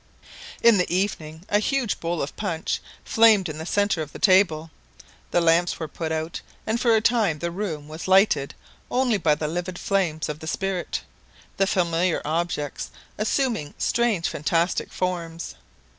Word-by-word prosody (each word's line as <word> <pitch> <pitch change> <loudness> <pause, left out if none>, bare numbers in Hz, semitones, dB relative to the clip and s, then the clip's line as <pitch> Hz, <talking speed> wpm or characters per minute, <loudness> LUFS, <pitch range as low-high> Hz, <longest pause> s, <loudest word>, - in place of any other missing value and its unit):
In 230 -4 +7
the 180 - 0
evening 170 -3 -2
a 205 - +3
huge 250 0 0
bowl 170 0 -1
of 140 - -6
punch 165 -6 -2 0.2
flamed 220 -4 +5
in 155 -1 -6
the 160 - -6
centre 205 -3 +1
of 150 -2 -6
the - - -7
table; 165 -5 +3 0.6
the - - +2
lamps 170 +1 +3
were 160 - -3
put 160 +2 -4
out, 160 +1 -3 0.2
and 225 +2 -1
for 230 -2 +4
a 220 - +3
time 220 -8 +2
the 170 +3 -3
room 170 -6 -4
was 155 +3 -7
lighted 190 -7 +4 0.3
only 245 -4 +2
by 155 -4 +3
the 150 - -3
livid 175 +3 -3
flames 175 -6 0
of 150 0 -5
the 160 - -8
spirit, 195 0 -2 0.5
the 195 - +3
familiar 175 -2 +1
objects 155 -2 -2 0.3
assuming 220 - 0
strange 235 -8 +1
fantastic 165 +4 0
forms. 170 -2 -3
175 Hz, 160 wpm, -24 LUFS, 160-205 Hz, 0.6 s, In